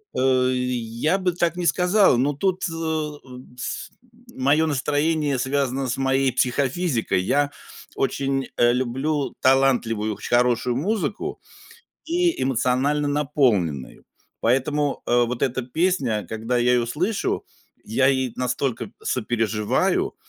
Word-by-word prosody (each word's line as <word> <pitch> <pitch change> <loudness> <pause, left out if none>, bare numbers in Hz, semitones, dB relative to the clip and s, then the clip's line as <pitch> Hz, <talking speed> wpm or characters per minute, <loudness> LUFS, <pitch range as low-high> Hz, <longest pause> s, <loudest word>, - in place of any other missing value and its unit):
А, 130 -1 +3
и 130 - 0 0.2
я 120 +9 -1
бы 185 -2 0
так 170 -1 0
не 175 - -2
сказал, 180 - +4
но 140 +4 +1
тут, 185 +5 -1
э, 160 -2 -2 0.5
с 125 - -5 0.4
мое 145 +5 +3
настроение 145 0 0
связано 135 0 -1
с 125 - -2
моей 135 0 +2
психофизикой. 130 - 0
Я 145 +9 +1 0.4
очень, 135 0 -1
э, 120 0 +4
люблю 135 +4 -1
талантливую 120 -5 +2
хорошую 120 0 +1
музыку 210 - -2 0.6
и 345 0 0
эмоционально 135 +3 +1
наполненную, 125 - 0 0.4
поэтому, 140 +4 0
э, 120 0 +3
вот 120 0 -4
эта 130 0 0
песня, 125 - 0
когда 115 +3 -2
я 120 +1 +3
ее 120 -1 +1
слышу, 180 - -1 0.4
я 130 +4 +1
ей 130 -3 0
настолько 125 -3 -2
сопереживаю, 110 -3 0
135 Hz, 120 wpm, -23 LUFS, 120-150 Hz, 0.6 s, сказал